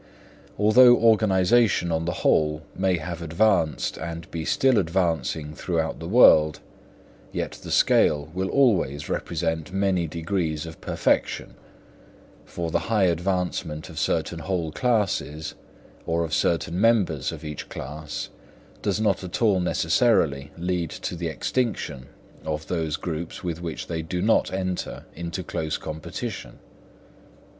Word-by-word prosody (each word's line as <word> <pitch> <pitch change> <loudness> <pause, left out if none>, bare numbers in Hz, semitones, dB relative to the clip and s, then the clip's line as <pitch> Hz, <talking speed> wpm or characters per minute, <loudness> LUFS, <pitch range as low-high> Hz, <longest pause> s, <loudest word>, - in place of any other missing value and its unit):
Although 120 +4 +7
organisation, 110 -3 +3
on 80 0 0
the 85 - 0
whole, 75 0 +2
may 95 -1 +1
have 85 +1 -6
advanced 85 -1 +1
and 85 0 -6
be 80 -1 -4
still 130 -4 +3
advancing 80 -4 -1
throughout 80 -1 -2
the 80 - -6
world, 80 -8 +6 0.7
yet - - -3
the - - -9
scale 75 -1 +3
will 95 +1 -2
always 95 - +2
present 80 +2 -2
many 95 -3 +1
degrees 80 -1 -2
of 80 0 -10
perfection; - - 0 0.9
for 85 -2 -4
the - - +2
high 110 -3 +3
advancement 90 -3 -1
of 80 - -6
certain 85 - -1
whole 85 -3 -2
classes, 100 -9 -1 0.5
or 85 0 +1
of 80 -1 -4
certain 85 +2 0
members 100 - +2
of - - -9
each 75 -1 -6
class, 75 -2 -6 0.5
does 100 0 0
not 110 -3 +1
at 90 -1 -4
all 105 -5 +3
necessarily 80 - +2
lead 90 -1 -1
to - - -5
the 85 0 -3
extinction 80 - -2 0.4
of 75 0 -3
those 80 -4 -1
groups 85 +1 -5
with 85 -2 -3
which 85 -3 -5
they 80 -1 -3
do 90 +3 -4
not 110 +5 +2
enter 95 -1 -3
into 85 +2 -5
close 80 -2 -3
competition. 80 0 -6
85 Hz, 135 wpm, -25 LUFS, 80-95 Hz, 0.9 s, Although